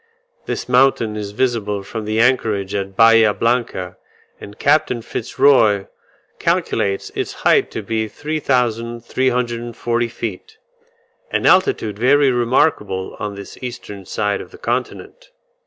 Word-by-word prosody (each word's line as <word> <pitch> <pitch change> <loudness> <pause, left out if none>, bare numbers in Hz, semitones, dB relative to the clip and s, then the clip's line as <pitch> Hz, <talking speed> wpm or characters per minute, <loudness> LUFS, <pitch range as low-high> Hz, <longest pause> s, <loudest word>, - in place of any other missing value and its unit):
This - - -3
mountain 125 -4 +3
is 105 -1 -4
visible 105 -3 -1
from 110 +2 -6
the 110 +1 -1
anchorage 110 -5 +1
at 95 -1 -3
Bahia 115 -1 +5
Blanca; 115 -6 -1 0.4
and 100 0 -11
Capt. 150 0 +2
Fitz 115 +1 -6
Roy 110 -8 +4 0.5
calculates 100 -1 0
its - - -3
height - - +4
to 110 - -6
be 110 +1 -2
3340 120 -3 -1
feet 115 -4 -7 0.7
an - - -1
altitude 110 - +3
very 140 +3 +4
remarkable 120 -6 0
on 105 -1 -4
this 100 -1 -10
eastern 120 -5 -7
side 105 -2 -1
of - - -11
the 415 - -14
continent. - - -4
115 Hz, 125 wpm, -19 LUFS, 105-125 Hz, 0.7 s, Bahia